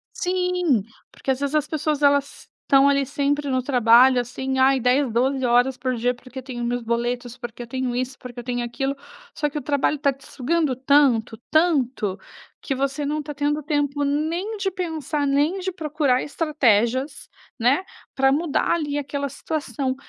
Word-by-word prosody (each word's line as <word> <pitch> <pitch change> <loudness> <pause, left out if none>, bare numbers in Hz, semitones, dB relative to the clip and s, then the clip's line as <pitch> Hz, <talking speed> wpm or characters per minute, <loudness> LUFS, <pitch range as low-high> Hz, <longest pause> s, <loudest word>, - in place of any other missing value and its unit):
Sim, 360 - +1 0.3
porque 270 - -3
às 260 - -1
vezes 285 +1 -2
as 300 -1 +1
pessoas 305 -1 -1
elas 285 -1 +1
estão 275 0 +5
ali 280 -1 +2
sempre 285 +2 -1
no 255 -1 +1
trabalho, 250 0 +5
assim: 265 +2 -3
"Ai, 265 +1 +4
10, 250 +2 +2
12h 250 +1 +2
por 255 0 -2
dia 245 +2 0
porque 255 +1 -10
tenho 250 -2 -6
meus 245 +1 -1
boletos, 240 +1 -2
porque 240 -1 -7
eu - - -11
tenho 255 0 -2
isso, 255 +1 -3
porque 245 -2 -9
eu - - -7
tenho 245 0 -2
aquilo." 270 +3 -2 0.4
Só 295 - -1
que 295 - -6
o - - -2
trabalho 285 +2 +1
está 280 -1 +1
te 275 - -14
sugando 295 +1 0
tanto, 260 -4 +3
tanto, 265 - +1 0.4
que 270 - -2
você 275 +2 -1
não 300 +2 -1
está 295 0 -6
tendo 290 +1 -1
tempo 290 -1 0
nem 325 +9 -1
de 390 -1 -1
pensar, 320 -5 -2
nem 290 +7 +1
de 375 0 -3
procurar 300 -6 0
estratégias, 260 -4 0 0.3
né, 255 +9 +3 0.3
para 270 0 +3
mudar 300 +1 0
ali 295 -4 0
aquela 280 0 -3
situação. 280 -2 -3
275 Hz, 175 wpm, -23 LUFS, 250-295 Hz, 0.4 s, estão